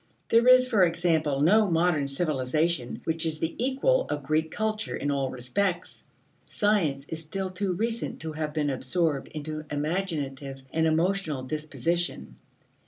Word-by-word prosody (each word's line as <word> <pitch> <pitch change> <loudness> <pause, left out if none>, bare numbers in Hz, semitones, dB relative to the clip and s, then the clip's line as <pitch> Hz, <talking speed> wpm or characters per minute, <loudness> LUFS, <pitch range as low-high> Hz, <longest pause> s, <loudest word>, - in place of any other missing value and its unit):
There 230 +2 +4
is, 255 0 +8
for 220 -7 +4
example, 165 -5 +1
no 205 +6 +5
modern 165 -4 +2
civilization 140 -1 0
which 165 0 -1
is 160 -2 0
the 160 +1 -2
equal 275 - +2
of 145 -1 -2
Greek 155 +3 0
culture 215 +3 -2
in 145 - -1
all 135 -2 0
respects. 170 +10 -2 0.4
Science 165 -10 +1
is 160 0 -3
still 190 +4 -4
too 185 0 -1
recent 230 +5 -2
to 160 - -4
have 155 0 -3
been 150 -1 0
absorbed 140 +2 -1
into 155 0 -6
imaginative 145 -4 -3
and 160 0 +2
emotional 160 -3 0
disposition. 155 +5 -3
160 Hz, 145 wpm, -27 LUFS, 145-185 Hz, 0.4 s, is